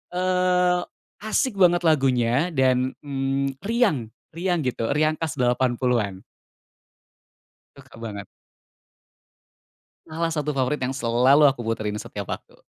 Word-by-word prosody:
eee, 180 -1 +2 0.4
asik 215 +1 -1
banget 175 -2 +4
lagunya 135 0 +2
dan, 130 -1 +2
mmm, 135 -1 -2
riang 200 - +1 0.3
riang 175 -2 0
gitu, 120 -3 -2
riang 155 +1 +1
khas 160 -1 -3
80-an. 120 -5 0 1.6
Suka - - -16
banget. 100 -3 -6 1.8
Salah 165 +1 -2
satu 150 -2 -2
favorit 130 +3 0
yang 130 +1 -2
selalu 130 +4 +4
aku 130 - -13
puterin 110 -2 -2
setiap 100 -2 -7
waktu. - - -8
135 Hz, 110 wpm, -24 LUFS, 125-170 Hz, 1.8 s, banget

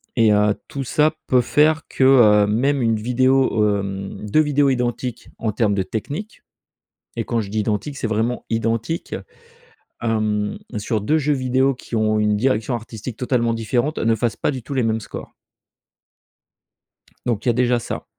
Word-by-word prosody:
et, 115 -3 +4
heu, 105 0 +3
tout 140 - -4
ça 155 +4 +2
peut 125 -1 +4
faire 155 +5 +3
que, - - 0
heu, 110 -6 +6
même 135 +6 +1
1 115 -1 +2
vidéo, 120 -3 +2
hem, 95 +1 -6
2 155 - +4
vidéos 145 -2 +2
identiques 125 -1 -2
en 110 - -1
terme 105 -1 +1
de 95 - 0
technique, 145 - -6 0.8
et - - 0
quand 115 -1 0
je 100 - -7
dis 110 - -1
identiques 110 +7 -2
c'est 120 - -2
vraiment 110 +3 -1
identiques. 115 +6 -2 0.9
Hem, 110 -2 0 0.2
sur 110 +1 -1
2 155 +10 +2
jeux 150 0 +1
vidéo 130 +1 +1
qui 125 - -10
ont 110 -1 +2
une 105 0 +2
direction 115 0 0
artistique 115 0 -6
totalement 120 -2 +1
différente, 120 +6 -1
ne 115 0 +2
fassent 115 0 -1
pas - - 0
du 130 -3 -5
tout 140 - -9
les 130 - +1
mêmes 110 0 0
scores. - - -9 1.9
Donc 115 -3 -1
il - - +3
y - - +6
a - - -1
déjà 125 0 +2
ça, - - -6
115 Hz, 175 wpm, -21 LUFS, 110-130 Hz, 1.9 s, heu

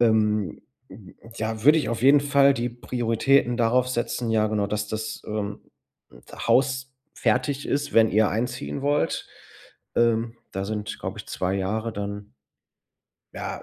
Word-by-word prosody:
Ähm, 105 -5 +2 0.3
hm, 95 -1 -13 0.2
ja, 110 +1 -3
würde 155 +2 +7
ich 145 - -2
auf 115 0 -3
jeden 140 +2 +7
Fall 140 -1 +4
die 120 0 -1
Prioritäten 120 +1 +1
darauf 125 +2 +2
setzen 120 -1 -2
ja, 110 -1 +3
genau, 105 -2 0
dass 105 +1 -2
das, 110 +1 -4
ähm, 105 -1 -4 0.9
Haus 130 0 +2 0.2
fertig 130 +5 0
ist, 145 +1 -1
wenn 110 -1 +6
ihr 110 0 +3
einziehen 120 +4 -3
wollt. 145 +1 0 0.7
Ähm, 115 0 +2 0.2
da 95 0 -3
sind, 105 0 -4
glaube - - -5
ich, - - -8
2 95 +1 -2
Jahre 110 +4 -2
dann 100 -2 -6 1.0
ja, - - -5
115 Hz, 145 wpm, -25 LUFS, 105-125 Hz, 1.0 s, würde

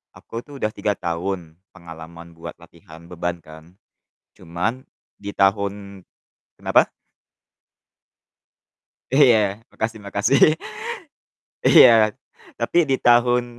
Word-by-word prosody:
aku 115 - -8
tuh 145 - -15
udah 110 - -1
3 105 -2 -2
tahun 85 -1 -5 0.2
pengalaman 85 0 -12
buat 85 +1 -9
latihan 85 -1 -16
beban 85 0 -4
kan. 80 +3 -15 0.6
Cuman 90 +10 -4 0.3
di 100 0 -7
tahun 100 0 -1 0.6
kenapa? - - +3 2.2
Iya 110 -7 +4
makasih 110 0 -4
makasih. 135 +10 +3 1.1
Iya, 110 -2 +7 0.5
tapi - - 0
di 135 -3 0
tahun 120 0 +3
100 Hz, 95 wpm, -21 LUFS, 85-115 Hz, 2.2 s, Iya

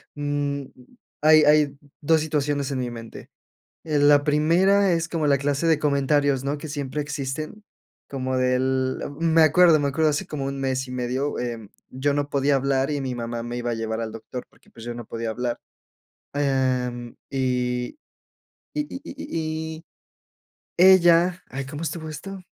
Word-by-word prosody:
mm, 145 -1 -2 0.6
hay 155 0 +7
hay 150 -2 +4 0.2
2 160 +1 +3
situaciones 145 -2 -1
en 130 - -2
mi 125 -1 -2
mente. 115 -1 -10 0.6
En 145 -2 +3
la 145 -1 +5
primera, 180 +7 +3
es 165 -1 0
como 160 -3 -1
la 140 -1 +3
clase 145 +3 0
de 160 -2 +4
comentarios, 140 -2 +2
¿no?, 140 +2 -1
que 155 - -7
siempre 145 -1 -3
existen, 150 +6 -5 0.5
como 130 -1 -2
del 130 +1 +1 0.2
me 165 -1 +4
acuerdo, 160 +1 +6
me 140 - +1
acuerdo, 155 +2 +2
hace 145 - -2
como 140 -3 -4
1 140 0 -4
mes 130 0 -1
y - - -8
medio, 125 +3 -2
em, 115 -3 -4 0.2
yo 140 +2 0
no 145 0 -1
podía 140 0 +2
hablar, 135 +1 +1
y 145 -1 -1
mi 130 -2 -3
mamá 115 -1 -4
me 120 +1 -5
iba 120 0 -2
a - - 0
llevar 110 0 -3
al 110 -1 -4
doctor, 115 +2 -7
porque, - - -26
pues, 115 - -12
yo 120 - -4
no 120 - -7
podía 115 +1 -4
hablar. 120 +1 -3 0.8
Em, 130 -4 -1
y 125 - -1 0.8
y 300 - 0
y 265 - -7
y 160 - -5
y 165 - -21 0.9
ella 175 -1 +5
ay, 135 +1 -5
¿cómo 145 +3 -7
estuvo 160 -1 -4
esto? 190 +5 -8
140 Hz, 170 wpm, -24 LUFS, 130-155 Hz, 0.9 s, hay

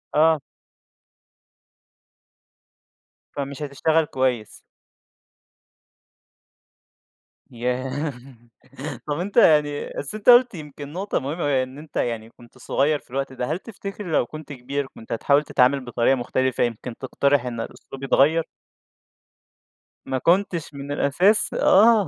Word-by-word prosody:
آه. 160 0 +5 2.9
فمش 140 0 -5
هتشتغل 155 +3 +1
كويس. 130 -6 -2 2.9
ياه! 130 +4 -2 0.9
طب 150 +1 -2
أنت 195 +5 -4
يعني 150 -8 +4
بس 145 - -4
أنت 215 +2 +1
قُلت 245 0 +7
يمكن 150 -2 -9
نقطة 195 +4 -1
مهمة 150 +5 -4
أوي، 145 - +1
يعني 130 -2 +2
إن 130 +2 -9
أنت 150 0 -13
يعني 115 -2 -2
كنت 120 +1 -19
صغيّر 145 +3 +1
في - - -27
الوقت 135 0 -3
ده، 125 -1 -3
هل 165 - -1
تفتكر 200 -1 -8
لو 150 - +3
كنت 155 +3 -9
كبير، 135 +2 -4
كنت 115 - -12
هتحاول 140 +5 +3
تتعامل 135 -1 +3
بطريقة 120 +2 +2
مختلفة، 130 +1 0
يمكن 120 0 -3
تقترح 140 0 +1
إن 120 -2 -4
الأسلوب 135 +3 -9
يتغيّر؟ 155 +4 +3 1.6
ما 130 - -1
كنتش 170 +1 +1
من 140 0 -7
الأساس 180 +10 +2
آه. 215 -1 +5
140 Hz, 120 wpm, -23 LUFS, 130-160 Hz, 2.9 s, قُلت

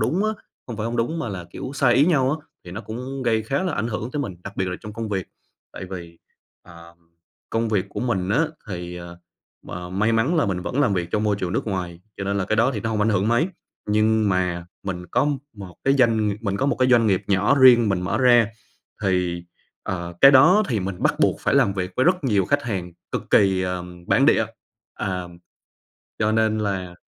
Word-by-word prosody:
đúng 190 +6 +1
á, 215 - +2 0.4
hông 120 -4 -6
phải 105 - -3
hông 120 +1 -3
đúng 140 +9 -1
mà 140 - -3
là 90 -3 -6
kiểu 130 - -6
sai 125 -4 +3
ý 140 +3 +5
nhau 135 -6 +3
á 155 0 -4 0.2
thì 90 - -10
nó 100 +5 -6
cũng 125 +4 -6
gây 110 -2 +1
khá 135 +9 -1
là 180 -4 -1
ảnh 110 -2 -1
hưởng 110 +2 -4
tới 145 - -3
mình, 100 -10 -5
đặc 100 -1 -8
biệt 95 - 0
là 90 - -4
trong 105 - -8
công 115 0 -5
việc. 95 -3 -2 0.5
Tại - - -7
vì, 85 -2 -8 0.4
ờm, 85 0 -15 0.5
công 115 0 0
việc 100 -3 0
của - - -6
mình 95 -7 -1
á 145 +10 +2 0.2
thì, 90 -2 -6
ờ, 85 0 -10 0.5
m - - -10 0.3
may 110 +2 +2
mắn 125 +10 +2
là 155 - +2
mình 90 -2 -2
vẫn 135 +8 -2
làm 105 -9 +2
việc 85 -1 -2
trong 105 - 0
môi 105 -2 +1
trường 90 -2 -3
nước - - -2
ngoài, 90 -4 -4 0.2
cho 95 - -4
nên 100 0 -1
là 95 - 0
cái 110 +2 -1
đó 115 +4 +3
thì 105 - -3
nó 115 - -2
hông 110 - -1
ảnh 105 - +2
hưởng 105 0 +1
mấy. 135 +10 +2 0.4
Nhưng 110 0 +2
mà 90 -2 -1 0.2
mình 90 -2 -5
có 115 - +1 0.3
một 95 -5 -11
cái 135 +1 +4
doanh 115 -5 +3
ng 100 - -3
mình 100 -3 -2
có 135 - 0
một - - +1
cái 130 0 +2
doanh 120 -3 +5
nghiệp 95 -3 +2
nhỏ 100 +7 +3
riêng 120 -4 +7
mình 95 -2 0
mở 90 - -1
ra 120 -3 +5 0.6
thì, 90 -2 0 0.4
ờ, 85 -2 -4
cái 135 - +9
đó 180 +10 +6
thì 110 -6 0
mình 95 0 -4
bắt - - +3
buộc - - +2
phải - - +1
làm 125 -8 +4
việc 90 -1 -3
với 130 - +3
rất 180 -3 +2
nhiều 100 -7 +2
khách 145 +5 +1
hàng 90 -6 -4 0.2
cực - - -4
kỳ, 95 -2 +4
ờm, 90 -1 -5
bản - - +3
địa. - - +4 0.5
Ờm, 90 -2 -4 0.8
cho 110 0 +1
nên 110 -1 +2
là 95 -4 -3
105 Hz, 235 wpm, -23 LUFS, 90-120 Hz, 0.8 s, cái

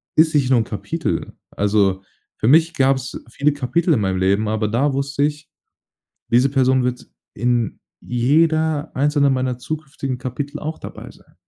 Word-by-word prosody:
ist 160 +1 +4
nicht 135 -3 +2
nur 130 - +4
'n - - +1
Kapitel. 110 - -3 0.2
Also, 100 -2 +1 0.3
für - - 0
mich 160 +5 +5
gab's 135 -1 0
viele 140 +4 +1
Kapitel 160 +5 +1
in 115 - +2
meinem 95 -2 0
Leben, 100 +3 +1
aber 110 0 0
da 135 +6 +1
wusste 140 +1 -1
ich, 150 0 -2 0.8
diese 125 +3 +4
Person 130 -1 +2
wird 125 0 -3 0.3
in 120 -1 -1 0.2
jeder 155 +4 +1
einzelne 145 +1 +2
meiner 130 -1 0
zukünftigen 135 -2 -5
Kapitel 140 +4 -5
auch 155 +1 -5
dabei - - -9
sein. - - -23
135 Hz, 155 wpm, -20 LUFS, 120-150 Hz, 0.8 s, mich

